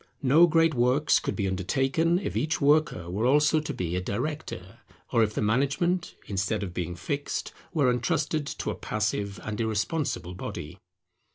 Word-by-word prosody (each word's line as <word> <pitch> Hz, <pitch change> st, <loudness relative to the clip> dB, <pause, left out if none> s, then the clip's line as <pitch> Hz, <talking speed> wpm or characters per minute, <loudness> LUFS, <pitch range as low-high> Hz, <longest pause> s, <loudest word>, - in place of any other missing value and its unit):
No 150 Hz, +6 st, +6 dB
great 165 Hz, -1 st, +3 dB
works 125 Hz, +4 st, +3 dB
could -, -, -3 dB
be 100 Hz, -3 st, -1 dB
undertaken 135 Hz, -, +1 dB
if 190 Hz, -, -4 dB
each 155 Hz, +1 st, 0 dB
worker 145 Hz, -, +2 dB
were 100 Hz, +7 st, 0 dB
also 150 Hz, +3 st, +4 dB
to 155 Hz, -, -4 dB
be 90 Hz, -1 st, -3 dB
a 90 Hz, -, 0 dB
director, 150 Hz, +12 st, -4 dB, 0.3 s
or 115 Hz, -, +3 dB
if 105 Hz, -1 st, +1 dB
the -, -, 0 dB
management, 140 Hz, -, +1 dB
instead 100 Hz, +1 st, -1 dB
of 90 Hz, -3 st, -5 dB
being 90 Hz, -1 st, -3 dB
fixed, 140 Hz, +12 st, -3 dB, 0.2 s
were 145 Hz, -7 st, +3 dB
entrusted 145 Hz, +5 st, 0 dB
to -, -, -3 dB
a -, -, -5 dB
passive 105 Hz, -2 st, -2 dB
and 110 Hz, 0 st, -3 dB
irresponsible 110 Hz, -, -1 dB
body. 90 Hz, -1 st, -7 dB
125 Hz, 165 wpm, -27 LUFS, 100-150 Hz, 0.3 s, No